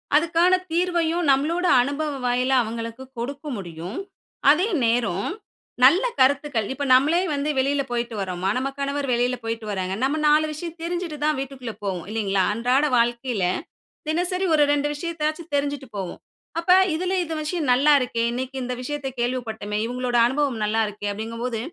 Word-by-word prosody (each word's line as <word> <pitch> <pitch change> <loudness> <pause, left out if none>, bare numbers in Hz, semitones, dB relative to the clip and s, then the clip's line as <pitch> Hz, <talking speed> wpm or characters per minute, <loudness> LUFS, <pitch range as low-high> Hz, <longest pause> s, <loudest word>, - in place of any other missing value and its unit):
அதுக்கான 335 +3 +3 0.2
தீர்வையும் 345 -1 +1
நம்ளோட 320 +7 +1 0.2
அனுபவ 285 +3 -2
வாயிலா 250 +2 +2
அவுங்களுக்கு 230 +2 -6
கொடுக்க 275 +5 -5
முடியும். 175 +2 -7 0.5
அதே 350 +7 +2 0.2
நேரம், 230 -5 0 0.5
நல்ல 330 +10 +7 0.2
கருத்துக்கள் 265 -4 +2
இப்ப 285 +1 -3
நம்மலே 300 +7 +4
வந்து 285 +1 -1
வெளில 275 +2 +1
போயிட்டு 235 -1 -2
வர்றோமா, 185 0 -2
நம்ம 265 +2 -1
கணவர் 280 0 -2
வெளில 245 +1 +1
போயிட்டு 225 -1 -4
வர்றாங்க. 190 -1 -2
நம்ம 285 +4 +1
4 305 +1 +4
விஷயம் 330 +2 -7
தெரிஞ்சுட்டு 340 -2 -3
தான் 305 -1 +2
வீட்டுக்குள்ள 260 -4 -6
போவோம் 185 -4 -3
இல்லிங்களா? 200 -3 +1
அன்றாட 250 +6 +2
வாழ்க்கையில, 235 -2 0 0.7
தினசரி 360 +3 0
ஒரு 300 - +5
2 290 0 +1
விஷயத்தயாச்சு 320 +1 -3
தெரிஞ்சுட்டு 285 -2 -2
போவோம். 190 -3 -5 0.4
அப்ப 340 +2 +1 0.2
இதுல 365 +3 -1
"இந்த 325 -1 -4
விஷயம் 305 -2 -2
நல்லாருக்கே, 260 -3 +3
இன்னக்கி 260 +2 -4
இந்த 250 0 -3
விஷயத்த 285 +2 -4
கேள்விப்பட்டமே, 225 -4 -2
இவுங்களோட 245 0 -1
அனுபவம் 265 -3 -1
நல்லாருக்கே" 210 -1 -1
அப்டிங்கும் 225 +3 -5
போது 235 -3 -2
265 Hz, 145 wpm, -23 LUFS, 230-305 Hz, 0.7 s, நல்ல